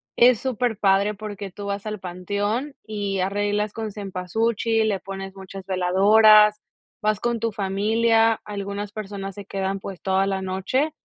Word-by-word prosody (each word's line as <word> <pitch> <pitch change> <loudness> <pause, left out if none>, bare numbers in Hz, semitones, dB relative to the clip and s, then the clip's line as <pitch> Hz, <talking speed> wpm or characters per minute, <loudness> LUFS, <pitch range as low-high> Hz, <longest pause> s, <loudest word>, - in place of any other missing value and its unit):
es 240 -2 +6
superpadre 210 -5 +1
porque 205 -1 -7
tú 205 +2 -8
vas 200 +1 -4
al 215 -1 -4
panteón 205 +9 -3
y 205 -2 -3
arreglas 205 +2 0
con 220 -1 -4
cempasúchil, 220 +3 0
le 195 -2 -1
pones 195 0 -7
muchas 195 0 -9
veladoras, 210 +3 +5 0.4
vas 215 -1 +1
con 235 0 -1
tu 230 +1 -1
familia, 225 +3 +2
algunas 200 0 -5
personas 200 -2 -6
se 205 0 -9
quedan, 195 0 -2
pues, 190 -1 -8
toda 190 0 +2
la 190 -1 -2
noche, 200 +11 -1
205 Hz, 145 wpm, -23 LUFS, 195-220 Hz, 0.4 s, es